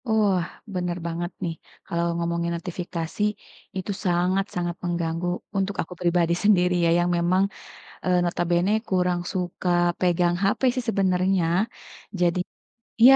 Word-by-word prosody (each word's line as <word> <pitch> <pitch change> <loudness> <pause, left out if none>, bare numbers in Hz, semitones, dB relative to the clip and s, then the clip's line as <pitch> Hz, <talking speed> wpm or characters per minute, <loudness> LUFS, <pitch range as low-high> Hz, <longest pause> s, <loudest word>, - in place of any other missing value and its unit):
Wah, 205 -5 +3 0.3
bener 180 -1 -1
banget 170 +1 -3
nih, 170 -2 -1 0.3
kalau 170 0 -1
ngomongin 170 0 -1
notifikasi, 170 +1 -5 0.6
itu 190 +2 -3
sangat-sangat 180 0 0
mengganggu 170 0 -1 0.3
untuk 195 +1 0
aku 180 - -6
pribadi 170 -1 +3
sendiri 180 -4 +4
ya. - - +4
Yang 175 0 +2
memang, 180 +3 +3 0.6
eee, 180 -1 +3
notabene 175 +1 +1 0.2
kurang 180 -1 +1
suka 180 -1 -3 0.3
pegang 175 -1 +3
HP 195 +1 +2
sih 255 - -2
sebenarnya. 190 -2 +2 0.8
Jadi 175 0 +3 0.6
iya 260 +3 +10
180 Hz, 125 wpm, -25 LUFS, 170-185 Hz, 0.8 s, iya